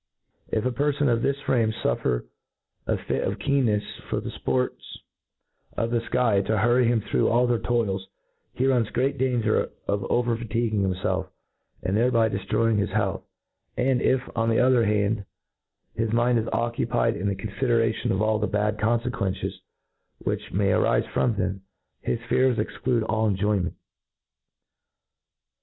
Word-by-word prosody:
If 110 - -1
a 130 - +1
perfon 145 +1 +1
of 115 - 0
this 140 +3 0
frame 115 -5 +2
' - - -9
fuffer - - 0 0.6
a - - +1
fit - - -2
of - - -2
keenncfs 125 -7 0
for - - 0
the - - -6
fports 65 -1 -1 1.0
of 115 0 0
the 120 - +2
Iky 115 -4 +1
to 110 - +1
hurry 120 +4 +3
him 115 -2 +2
through - - +1
all 120 +2 +3
their 120 -2 +1
toils, 105 -5 -1 0.5
he 130 - +1
runs 125 -5 +2
great 135 +2 0
danger 120 -4 +1 0.2
of 100 -1 0
over 120 -1 +2
fatiguing 115 -2 -1
himfclf, 95 -1 -1 0.6
and 95 +2 0
thereby 115 0 +3
deftroying 105 +3 0
his 100 - 0
health; 100 -2 -1 0.6
and 125 0 +2
if, 130 -1 +2
on 115 -1 +1
the 115 - +2
other 125 -2 +4
hand, 105 0 +1 0.7
his 115 -1 -1
mind 120 +1 +3
is 110 - -3
occupied 115 0 0
in 100 0 -2
the 100 - 0
confideration 115 +3 0
of 95 +2 +1
all 110 0 +2
the 105 - 0
bad 105 +1 0
confequences 110 -4 -1 0.6
which - - -4
may 100 +2 +1
arife - - +2
from 120 -3 +2
them, 95 0 -2 0.4
his - - -1
fears 130 -2 +3
exclude 120 -3 -1
all 110 0 0
enjoyment. 100 -2 0
115 Hz, 155 wpm, -25 LUFS, 105-120 Hz, 1.0 s, other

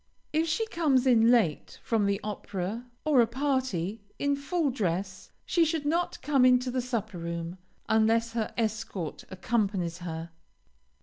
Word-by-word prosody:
If 320 +2 +2
she 340 +8 0
comes 305 - +2
in 230 -3 +5
late 220 -11 +2
from 220 -3 +1
the 200 0 +1
opera 210 +2 -4 0.2
or 290 -5 +5
a 230 - +3
party, 235 - -1 0.2
in 285 0 +1
full 285 +1 0
dress, 190 -4 -3
she 340 - +3
should 320 -2 -1
not 340 +4 0
come 280 -3 +3
into 250 0 +4
the 255 0 0
supper 220 -7 -3
room, 170 +1 -5 0.3
unless 225 +1 +3
her 225 -2 -1
escort 215 -7 -3
accompanies 190 -3 -1
her. 165 -1 -6
230 Hz, 145 wpm, -28 LUFS, 190-270 Hz, 0.3 s, in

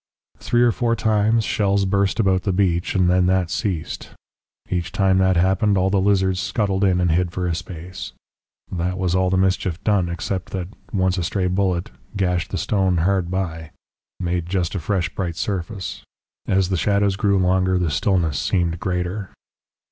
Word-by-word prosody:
"Three 120 0 +2
or 120 - +4
four 115 +1 0
times 110 0 +2
shells 100 -1 +1
burst 100 +2 +1
about 95 -3 +3
the 100 - -1
beach, 90 -2 0
and 90 -2 +3
then 90 0 +3
that 95 -2 +1
ceased. 95 -8 -3 0.6
Each 90 -1 -2
time 95 -1 +2
that 95 -1 +3
happened 95 +3 +2
all 95 +1 +2
the 100 -1 +2
lizards 95 -2 +2
scuttled 100 -2 0
in 95 -2 +3
and 90 -2 +2
hid 85 +1 +1
for 90 0 -3
a 85 - 0
space. 90 +1 -7 0.6
That 90 0 -2
was 90 -2 0
all 95 0 +2
the 95 - +1
mischief 95 -2 0
done, 100 -5 +2
except 95 +2 -4
that 90 -2 -3 0.2
once 95 -2 +1
a - - -1
stray 95 +2 -1
bullet 90 -1 0 0.3
gashed 90 -3 0
the - - -3
stone 95 -3 +1
hard 90 +1 +1
by 80 -4 -4 0.5
made 90 -2 -2
just 90 -2 -1
a 100 - -2
fresh 90 +2 -1
bright 85 -4 -3
surface. 95 +1 -4 0.5
"As 95 -1 +2
the 95 - 0
shadows 100 +1 +2
grew 100 0 +2
longer, 95 0 +2
the 85 -4 0
stillness 85 -2 +1
seemed 85 -3 0
greater. 90 +2 -2
95 Hz, 180 wpm, -22 LUFS, 90-100 Hz, 0.6 s, or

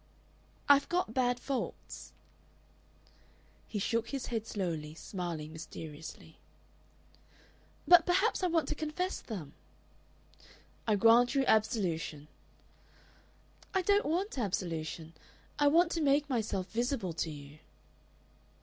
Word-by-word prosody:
"I've 285 0 +5
got 350 -10 0
bad 245 -1 +1
faults." 265 0 -5 1.6
He 215 - -4
shook 230 +3 0
his 275 -3 -3
head 225 -2 -3
slowly, 160 -6 -3
smiling 165 -4 -5
mysteriously. 160 -1 -9 1.5
"But 350 -2 +8
perhaps 380 +5 +2
I 365 - +2
want 330 -2 +1
to - - 0
confess 310 +5 -3
them." 180 - -7 1.3
"I 215 - +4
grant 235 +5 +5
you 270 -1 +3
absolution." 180 - 0 1.5
"I 380 - +3
don't 405 +3 +3
want 350 0 -1
absolution. 165 -5 -3 0.5
I 290 - +5
want 335 +3 +5
to 330 - -1
make 285 0 +3
myself 215 -7 -2
visible 235 -5 -1
to 165 0 -2
you." 145 0 -10
230 Hz, 110 wpm, -32 LUFS, -, 1.6 s, But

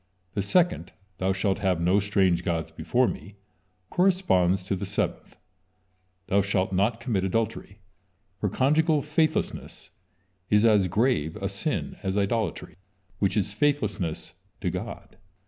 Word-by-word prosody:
The 100 - -1
second: 160 - +1 0.3
"Thou 95 +1 +1
shalt 95 0 0
have 95 -4 +1
no 90 +4 +3
strange 95 -3 +2
gods 85 -2 -2
before 125 0 +1
me," 100 -2 -6 0.6
corresponds 95 - +2
to 100 - -1
the 90 - -5
seventh: - - -3 0.9
"Thou 100 +2 +2
shalt 95 -1 0
not 105 +5 +1
commit 115 -6 -1
adultery," 100 0 -2 0.6
for 105 - 0
conjugal 150 - +2
faithlessness 155 +1 -1 0.6
is 105 +1 +4
as 105 -4 +4
grave 105 - +1
a 100 -2 -3
sin 100 +10 -3
as 95 0 -2
idolatry, 100 -4 -1 0.4
which 100 0 +1
is 100 0 0
faithlessness 105 - -1 0.3
to - - -1
God. - - -7
100 Hz, 130 wpm, -26 LUFS, 95-120 Hz, 0.9 s, is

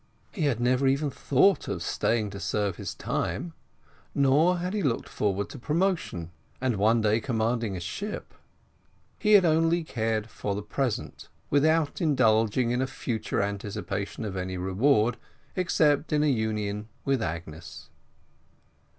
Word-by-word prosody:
He 175 -8 -2
had 130 -6 +1
never 125 +2 +2
even 140 +2 +1
thought 160 +10 +3
of - - -3
staying 110 -3 0
to 100 - -7
serve 100 -3 -1
his - - -5
time, 100 - -3 0.6
nor 145 +6 +4
had 180 +2 -3
he 210 - 0
looked 130 -9 0
forward 100 -1 -1
to 140 - -9
promotion, 155 - -1 0.3
and 125 -4 0
one 110 +3 +3
day 110 +1 +3
commanding 115 -4 -1
a - - -4
ship. 200 - -5 0.9
He 210 -2 +3
had 195 -3 +7
only 165 +1 +3
cared 110 -6 -1
for 100 -3 -4
the 105 - -4
present, 125 +2 -3 0.2
without 155 +2 +2
indulging 115 -5 +3
in 125 +1 +1
a 130 - 0
future 110 -6 -2
anticipation 100 -1 -4
of 100 -2 -4
any 95 0 -3
reward, 110 +5 +2 0.4
except 155 -5 +2
in 150 0 +3
a - - +3
union 105 -4 -1 0.2
with 135 -3 +1
Agnes. 80 -2 -6
120 Hz, 145 wpm, -27 LUFS, 105-150 Hz, 0.9 s, had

